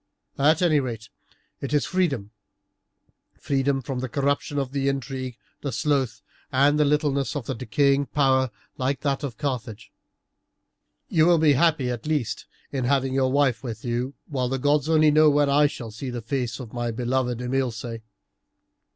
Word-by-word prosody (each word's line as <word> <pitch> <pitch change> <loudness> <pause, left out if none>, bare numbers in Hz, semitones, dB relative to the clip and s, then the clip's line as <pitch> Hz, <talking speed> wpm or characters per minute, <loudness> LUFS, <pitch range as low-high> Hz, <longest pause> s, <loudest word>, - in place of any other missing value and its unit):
At 155 +5 +4
any 155 -4 +4
rate 115 -4 -5 0.5
it 140 +1 -2
is 145 - +2
freedom 140 - -1 1.1
freedom 135 -1 0
from 130 0 -4
the 130 0 -3
corruption, 140 +2 -1
the 140 -1 -1
intrigue, 130 -2 -4 0.2
the 140 - -3
sloth, 130 +2 0 0.3
and 145 +3 +3
the 150 - +4
littleness 145 -1 +1
of 140 -5 -4
a 135 - -1
decaying 140 +4 +1
power 130 -2 +2 0.3
like 130 +1 -1
that 140 -2 0
of 125 -6 -4
Carthage. 120 -6 -4 1.2
You 160 0 +3
will 175 -1 +5
be 155 -2 +5
happy 140 -3 +2
at 120 +2 -5
least 150 -7 -2 0.2
in 130 -3 -2
having 135 0 +1
your 130 -1 +2
wife 140 -3 +2
with 115 -4 -6
you, 125 +3 -2
while 130 -3 -2
the 135 - -1
gods 145 +2 +1
only 155 -1 +5
know 155 +1 +6
when 145 -1 +3
I 145 +1 +5
shall 120 -5 -7
see 120 +5 -6
the 120 -2 -5
face 120 -1 -2
of 120 -4 -9
my 120 -1 -2
beloved 125 +1 -1
Imilce. 125 -3 -2
135 Hz, 165 wpm, -25 LUFS, 125-145 Hz, 1.2 s, know